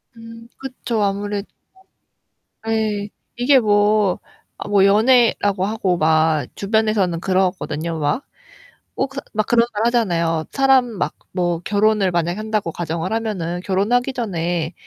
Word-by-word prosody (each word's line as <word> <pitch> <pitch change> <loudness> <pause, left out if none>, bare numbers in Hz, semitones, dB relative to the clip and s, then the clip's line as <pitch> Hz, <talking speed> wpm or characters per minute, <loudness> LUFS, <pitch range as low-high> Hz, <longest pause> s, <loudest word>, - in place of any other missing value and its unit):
음 230 0 -12
그쵸. 245 -4 -4
아무래도 200 0 -2 1.2
네, 215 -2 -1 0.3
이게 260 +3 +4
뭐 205 -2 +2 0.4
어 - - -7
뭐 200 -2 +4
연애라고 210 -2 +3
하고 195 -4 0
막 155 -1 +2
주변에서는 205 -4 0
그러거든요. 180 -4 -1
막. 145 - -1 0.7
뭐 - - -1
그래서 275 +1 -8
막 215 0 +1
그런 235 0 +3
말 210 +2 0
하잖아요. 170 -9 +1
사람 270 -2 +4
막 195 -11 -3 0.2
뭐 175 -2 -1
결혼을 205 -2 +2
만약에 175 +3 -1
한다고 215 -5 -2
가정을 170 +3 -3
하면은 185 -6 -2
"결혼하기 225 +8 0
전에 175 -8 -2
205 Hz, 275 characters per minute, -20 LUFS, 175-225 Hz, 1.2 s, 이게